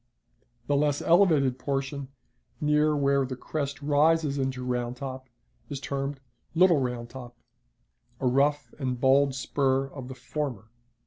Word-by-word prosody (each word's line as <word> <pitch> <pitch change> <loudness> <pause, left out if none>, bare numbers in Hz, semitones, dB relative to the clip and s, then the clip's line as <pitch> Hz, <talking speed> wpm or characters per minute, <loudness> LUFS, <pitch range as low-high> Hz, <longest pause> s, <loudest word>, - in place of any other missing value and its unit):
The 145 - +1
less 145 0 +2
elevated 155 -8 +4
portion, 140 0 -3 0.5
near 150 0 +3
where 140 -1 +2
the 130 0 -4
crest 145 +2 -4
rises 150 0 +3
into 130 -1 -2
Round 125 0 -2
Top, 130 -1 -7 0.4
is 140 -2 -4
termed 140 0 -3 0.4
"Little 175 -2 +5
Round 125 -2 -3
Top," 120 -1 -10 0.8
a - - -3
rough 140 0 +2
and 130 -3 -2
bold 135 +1 +4
spur 135 0 +1
of 135 -2 -8
the 130 - -8
former. 125 -4 -5
135 Hz, 135 wpm, -27 LUFS, 130-145 Hz, 0.8 s, Little